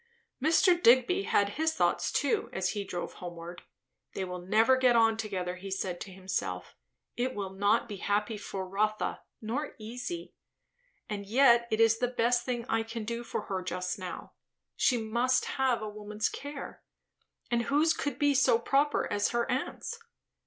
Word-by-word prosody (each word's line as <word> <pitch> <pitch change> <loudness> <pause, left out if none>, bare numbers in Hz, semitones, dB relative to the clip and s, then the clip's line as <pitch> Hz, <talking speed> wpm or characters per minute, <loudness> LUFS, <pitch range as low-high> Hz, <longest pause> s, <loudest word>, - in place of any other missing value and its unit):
Mr. 345 +4 +4
Digby 260 +11 +5
had 200 0 +2
his 320 0 +1
thoughts - - +1
too 430 -2 0
as 190 0 -1
he 205 -2 -2
drove 180 -2 -5
homeward. 175 0 -8 0.5
They 190 - -2
will 180 0 -5
never 220 +8 +4
get 255 -2 +4
on 225 -1 +5
together, 185 -5 -3
he 195 +2 -8
said 190 -2 -3
to 195 - -7
himself. 185 - -4 0.4
It 255 +2 -1
will 195 -2 -4
not 200 +4 +2
be 205 -3 -6
happy 210 +3 0
for 195 -2 -5
Rotha, 215 +3 -1 0.2
nor 260 +8 -3
easy. 245 +10 -6 0.7
And 200 -1 -5
yet 235 0 +5
it 220 - 0
is 225 0 +4
the 245 - +2
best 240 0 +1
thing 240 -2 -2
I 225 -2 +1
can 225 0 -5
do 235 +2 -4
for - - -3
her 190 -2 -3
just 180 +2 -3
now. 185 -1 -7 0.4
She 250 - +3
must 235 +3 +1
have 260 -4 0
a - - -3
woman's 210 +1 -3
care; 285 0 -7 0.7
and 235 0 +1
whose 305 +4 +3
could 285 -5 -3
be 290 0 +3
so 260 -3 +4
proper 280 +5 +1
as 205 0 +2
her 235 0 0
aunt's? 295 - -3
225 Hz, 170 wpm, -30 LUFS, 195-255 Hz, 0.7 s, Digby